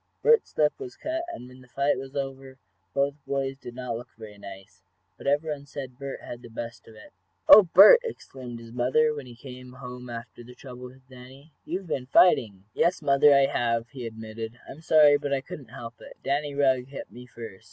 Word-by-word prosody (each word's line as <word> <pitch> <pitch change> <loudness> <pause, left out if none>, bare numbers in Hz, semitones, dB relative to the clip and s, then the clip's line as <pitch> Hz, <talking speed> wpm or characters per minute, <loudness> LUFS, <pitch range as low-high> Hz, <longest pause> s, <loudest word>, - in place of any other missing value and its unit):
Bert's 465 0 +3
lip 150 -1 +3
was 125 - -8
cut, 325 +2 -3
and 125 - -9
when 125 0 -15
the 125 - -18
fight 140 +3 0
was 135 +1 -9
over 135 -1 -5 0.3
both 140 +6 0
boys 135 -1 -2
did 120 -3 -11
not 125 -2 -4
look 120 +2 -8
very 105 -2 -11
nice. 95 -1 -12 0.3
But - - -10
everyone 145 0 -1
said 130 -3 -8
Bert 140 -1 -6
had 120 - -9
the 120 - -12
best 115 0 -8
of 110 - -14
it. 105 - -15 0.3
"Oh, 215 - +11
Bert!" 200 - +10
exclaimed 130 - -8
his 115 0 -12
mother, 130 +6 +2
when 145 -3 -8
he 120 - -12
came 125 0 -11
home 125 -1 -9
after 120 0 -9
the 125 +1 -14
trouble 125 -1 -10
with 130 +1 -14
Danny. 130 +4 -15
"You've 185 +4 -4
been 135 -6 -4
fighting!" 110 - +4
"Yes, 175 -2 +1
mother, 140 +1 +5
I 140 0 +5
have," 115 -2 -1
he 125 -4 -7
admitted. 110 +1 -8
"I'm 150 - -11
sorry, 150 -3 +5
but 140 - -3
I 135 - -2
couldn't 135 -2 -10
help 120 -2 -10
it. - - -13
Danny 145 +1 -1
Rugg 130 -3 +2
hit 135 0 -9
me 125 +1 -12
first. 115 -6 -10
130 Hz, 205 wpm, -26 LUFS, 120-140 Hz, 0.3 s, Oh